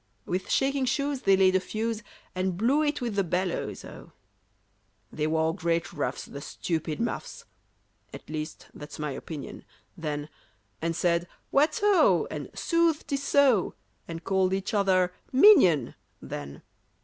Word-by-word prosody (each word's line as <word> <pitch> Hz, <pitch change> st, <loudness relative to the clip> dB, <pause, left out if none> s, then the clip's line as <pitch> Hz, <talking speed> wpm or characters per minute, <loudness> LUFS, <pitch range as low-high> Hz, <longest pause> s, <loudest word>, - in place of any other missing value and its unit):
With 185 Hz, +1 st, -3 dB
shaking 270 Hz, 0 st, +1 dB
shoes 280 Hz, +1 st, -1 dB
they 195 Hz, -1 st, +4 dB
laid 190 Hz, -1 st, +4 dB
a -, -, +5 dB
fuse, 220 Hz, +4 st, -3 dB, 0.3 s
And 185 Hz, -1 st, -1 dB
blew 255 Hz, +9 st, +3 dB
it 295 Hz, -2 st, 0 dB
with 235 Hz, -3 st, -2 dB
the 200 Hz, -1 st, +1 dB
bellows, 180 Hz, +1 st, -2 dB
oh! -, -, -12 dB, 1.0 s
They 150 Hz, 0 st, -1 dB
wore 160 Hz, +1 st, +1 dB
great 170 Hz, -2 st, -1 dB
ruffs, -, -, -3 dB
the 140 Hz, -, -9 dB
stupid 160 Hz, 0 st, -3 dB
muffs, 235 Hz, -, -4 dB, 0.7 s
(At -, -, -11 dB
least 155 Hz, 0 st, -6 dB
that's 150 Hz, -, -10 dB
my 150 Hz, -1 st, -3 dB
opinion) 145 Hz, +2 st, -7 dB, 0.3 s
then; 150 Hz, -3 st, -4 dB, 0.5 s
And 165 Hz, 0 st, -1 dB
said 170 Hz, 0 st, +1 dB, 0.2 s
"What 300 Hz, +3 st, +3 dB
ho!" 410 Hz, -3 st, +4 dB
and -, -, -5 dB
"Sooth, 335 Hz, -2 st, +1 dB
'tis 280 Hz, -1 st, -2 dB
so!" 275 Hz, -8 st, +3 dB, 0.3 s
And 165 Hz, 0 st, -7 dB
called 190 Hz, 0 st, +1 dB
each 195 Hz, +4 st, -4 dB
other 185 Hz, -3 st, +2 dB, 0.2 s
"minion!" 255 Hz, -, +6 dB, 0.3 s
then. 70 Hz, 0 st, -8 dB
185 Hz, 145 wpm, -27 LUFS, 165-260 Hz, 1.0 s, minion